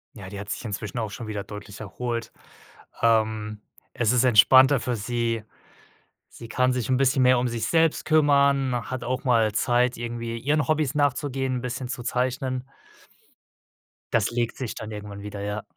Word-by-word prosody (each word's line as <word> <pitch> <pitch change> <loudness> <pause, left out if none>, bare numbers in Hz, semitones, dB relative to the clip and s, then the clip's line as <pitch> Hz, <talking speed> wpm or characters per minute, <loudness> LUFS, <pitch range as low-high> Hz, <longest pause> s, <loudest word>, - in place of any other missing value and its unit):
Ja, 100 -5 -9
die 100 0 -7
hat 105 - -8
sich - - -4
inzwischen 105 +2 -4
auch 110 -2 -3
schon 115 +1 -7
wieder 105 -2 -4
deutlich 105 0 -10
erholt. 115 +2 -4 0.7
Ähm, 110 -2 +1 0.3
es 115 -2 +1
ist 125 0 +3
entspannter 130 +4 +6
für 125 0 -2
sie. 115 +1 -2 0.9
Sie 115 - -11
kann 125 +2 +2
sich 125 -1 -2
'n 130 - +2
bisschen 135 0 +2
mehr 125 -1 +5
um 125 0 0
sich 115 -2 -2
selbst 165 -1 +2
kümmern, 140 -4 +3 0.2
hat 130 -1 -4
auch 130 +1 -2
mal 115 -4 +3
Zeit, 120 +2 +1
irgendwie, 115 0 -4
ihren 145 +5 0
Hobbys 155 -3 +1
nachzugehen, 135 -2 0
'n - - -2
bisschen 125 0 -4
zu 125 - -5
zeichnen. 130 +1 -2 1.4
Das 115 -1 +2
legt 120 -1 -2
sich 125 -4 -4
dann 110 0 -7
irgendwann 105 -1 -8
wieder, 100 0 -7
ja. 105 +1 -4
120 Hz, 170 wpm, -25 LUFS, 110-130 Hz, 1.4 s, entspannter